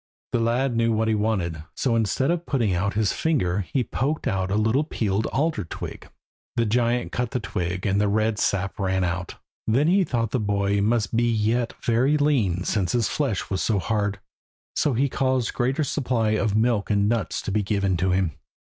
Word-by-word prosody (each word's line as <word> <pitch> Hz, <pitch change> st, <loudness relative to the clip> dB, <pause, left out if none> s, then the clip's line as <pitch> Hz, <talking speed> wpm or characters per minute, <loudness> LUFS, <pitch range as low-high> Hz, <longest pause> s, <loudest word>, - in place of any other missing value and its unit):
The 120 Hz, -, +1 dB
lad 120 Hz, +2 st, +1 dB
knew 115 Hz, 0 st, +2 dB
what 110 Hz, 0 st, +1 dB
he -, -, +3 dB
wanted; 100 Hz, -7 st, -1 dB
so 125 Hz, -4 st, +1 dB
instead 115 Hz, -, +1 dB
of 175 Hz, 0 st, -2 dB
putting 115 Hz, -9 st, +1 dB
out 100 Hz, +3 st, -1 dB
his 105 Hz, -2 st, +1 dB
finger 105 Hz, -, 0 dB
he 130 Hz, -, +1 dB
poked 140 Hz, +6 st, -2 dB
out 95 Hz, -5 st, 0 dB
a 100 Hz, -, 0 dB
little 110 Hz, +7 st, +2 dB
peeled 110 Hz, -7 st, -1 dB
alder 150 Hz, -6 st, 0 dB
twig. 80 Hz, -, -8 dB, 0.5 s
The 115 Hz, -1 st, +2 dB
giant 120 Hz, +2 st, +1 dB
cut 125 Hz, -1 st, -1 dB
the 125 Hz, -, -2 dB
twig, 95 Hz, -4 st, -3 dB
and 100 Hz, 0 st, +2 dB
the 105 Hz, -, +2 dB
red 110 Hz, +1 st, +1 dB
sap 100 Hz, +2 st, -1 dB
ran 95 Hz, -1 st, +1 dB
out. 90 Hz, +1 st, -3 dB, 0.3 s
Then 130 Hz, +7 st, +3 dB
he 190 Hz, +3 st, +4 dB
thought 115 Hz, -, -1 dB
the 130 Hz, -, 0 dB
boy 100 Hz, -1 st, +1 dB
must 115 Hz, +2 st, +1 dB
be 120 Hz, 0 st, +2 dB
yet 115 Hz, +2 st, 0 dB
very 125 Hz, +6 st, +3 dB
lean 115 Hz, -, +1 dB
since 95 Hz, -4 st, 0 dB
his 120 Hz, -2 st, +1 dB
flesh 130 Hz, -12 st, -2 dB
was 95 Hz, -, 0 dB
so 110 Hz, -, +1 dB
hard, 100 Hz, 0 st, -1 dB, 0.6 s
so 145 Hz, -, +2 dB
he 135 Hz, +4 st, +2 dB
caused 130 Hz, -2 st, 0 dB
a -, -, -22 dB
greater 130 Hz, +4 st, 0 dB
supply 125 Hz, -6 st, 0 dB
of 110 Hz, -1 st, +1 dB
milk 110 Hz, -2 st, +1 dB
and 100 Hz, -1 st, +2 dB
nuts 115 Hz, -2 st, -1 dB
to -, -, -3 dB
be 105 Hz, +2 st, +1 dB
given 100 Hz, -1 st, 0 dB
to 95 Hz, +3 st, +1 dB
him. 90 Hz, -2 st, +1 dB
110 Hz, 200 wpm, -24 LUFS, 100-125 Hz, 0.6 s, he